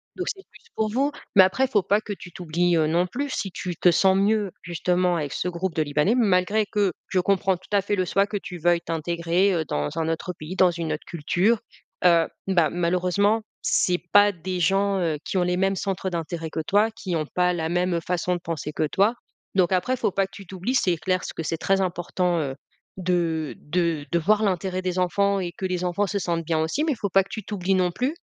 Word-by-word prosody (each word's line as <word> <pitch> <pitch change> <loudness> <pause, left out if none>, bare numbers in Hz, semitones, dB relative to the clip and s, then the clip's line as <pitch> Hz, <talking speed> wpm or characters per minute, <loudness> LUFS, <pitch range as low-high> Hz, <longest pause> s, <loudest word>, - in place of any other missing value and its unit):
donc 365 - -4
c'est 385 -1 -16
plus - - -19
pour 220 -1 0
vous, 270 +6 +1 0.2
mais 190 - +9
après 190 +8 +2
il - - -5
faut 205 -5 +2
pas 205 +3 +2
que 210 - -5
tu 180 - -11
t'oublies, 175 0 0
heu, 155 -1 +3
non 170 +3 +2
plus 280 +9 -3
si 195 -7 -3
tu 175 0 -5
te 180 - +4
sens 190 +3 +4
mieux, 205 0 +1
justement 180 +1 0
avec 145 -3 -3
ce - - -2
groupe 175 0 -3
de 160 - +1
libanais, 150 - +1
malgré 210 -2 +2
que 200 -3 0 0.2
je 185 - +1
comprends 190 0 +1
tout 180 - -21
à 200 - +4
fait 205 +1 -1
le 185 -2 0
choix 195 +2 +2
que 205 0 -3
tu 180 -2 -7
veuilles 170 +1 +2
t'intégrer, 170 +4 0
heu, 165 -3 0
dans 75 - -2
un 160 - 0
autre 165 +3 -2
pays, 155 +4 -6
dans 185 -2 +5
une 165 -2 -3
autre 150 - -6
culture, 180 +7 +1 0.5
heu, 170 -2 +5 0.2
bah, 175 -4 +3
malheureusement, 180 +5 +1 0.2
c'est 180 -1 +2
pas 205 0 +6
des 180 +1 -4
gens, 195 +3 +2
heu, 165 -3 0
qui 190 - -3
ont 180 - +3
les 180 0 0
mêmes 195 +1 +1
centres 190 -1 -2
d'intérêt 165 -1 -4
que 160 - -4
toi, 205 +7 +2
qui 205 -5 -4
ont 155 -2 -1
pas 180 0 +2
la 160 -2 -2
même 175 0 0
façon 180 0 0
de - - -4
penser 155 -2 -4
que 155 - 0
toi, 205 +9 +2 0.4
donc 185 -2 +3
après 185 +8 +1
faut 200 - 0
pas 195 +1 +1
que 195 - -37
tu 195 - -10
t'oublies 190 +7 -3
c'est 180 -9 +2
clair 185 +2 -1
ce - - -6
que - - -5
c'est 165 +1 -2
très 195 +4 +1
important, 175 -1 -1
heu, 135 -4 -3 0.4
de 170 -4 -1
de 165 -1 -1
de 170 - +2
voir 210 +6 +2
l'intérêt 185 -1 -1
des 185 0 -2
enfants 200 +2 +2
et 175 -2 -4
que 190 - -5
les 180 -1 -1
enfants 190 +3 0
se 200 +2 -1
sentent 170 -3 -1
bien 160 -1 0
aussi, 160 - 0
mais 315 -2 +1
faut 205 -3 -3
pas 195 +1 +4
que - - -21
tu 220 - -5
t'oublies 195 -1 -1
non 180 -1 +2
plus, 255 - -1
180 Hz, 240 wpm, -24 LUFS, 170-195 Hz, 0.5 s, mais